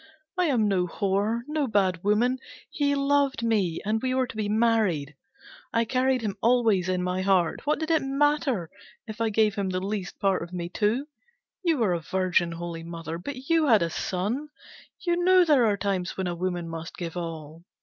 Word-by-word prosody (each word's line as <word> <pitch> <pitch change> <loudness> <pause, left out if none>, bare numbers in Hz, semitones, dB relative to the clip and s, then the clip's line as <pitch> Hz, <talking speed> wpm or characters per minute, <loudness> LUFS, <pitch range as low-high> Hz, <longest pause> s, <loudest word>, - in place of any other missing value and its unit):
I 360 -1 +2
am 245 -9 +2
no 185 -3 +1
whore, 200 +5 0
no 300 -2 -1
bad 190 -6 +1
woman, 235 +6 +2 0.3
he 285 -1 +1
loved 280 -1 +1
me, 205 -8 +1
and 220 +1 0
we 255 0 0
were 260 0 +2
to 240 - -10
be 215 -1 -2
married. 210 - +1 0.6
I 230 0 +2
carried 255 +1 +1
him 205 -1 -3
always 225 -6 +3
in 180 -1 0
my 180 +1 -1
heart, 185 - +1
what 300 - +2
did 315 +1 -2
it 320 - +3
matter 270 - +1 0.3
if 220 +1 -7
I 225 - +2
gave 215 -1 +2
him 195 -2 -2
the 185 0 -1
least 195 -1 -4
part 195 -2 +1
of 170 +2 -7
me 175 -1 -4
too? 220 +8 0 0.6
You 335 -5 +2
were 215 -7 +2
a 170 - -1
virgin, 180 0 0
Holy 170 0 -6
Mother, 165 0 -6
but 265 +6 -7
you 330 -2 +3
had 220 -8 +5
a 165 - -2
son, 215 - -2 0.6
you 350 0 +1
know 370 0 +6
there 280 -8 +4
are 205 -1 +1
times 190 -2 -2
when 190 - -1
a 175 - -1
woman 175 -1 -3
must 165 0 -7
give 170 -1 -5
all. 165 -2 -6
210 Hz, 200 wpm, -26 LUFS, 180-260 Hz, 0.6 s, know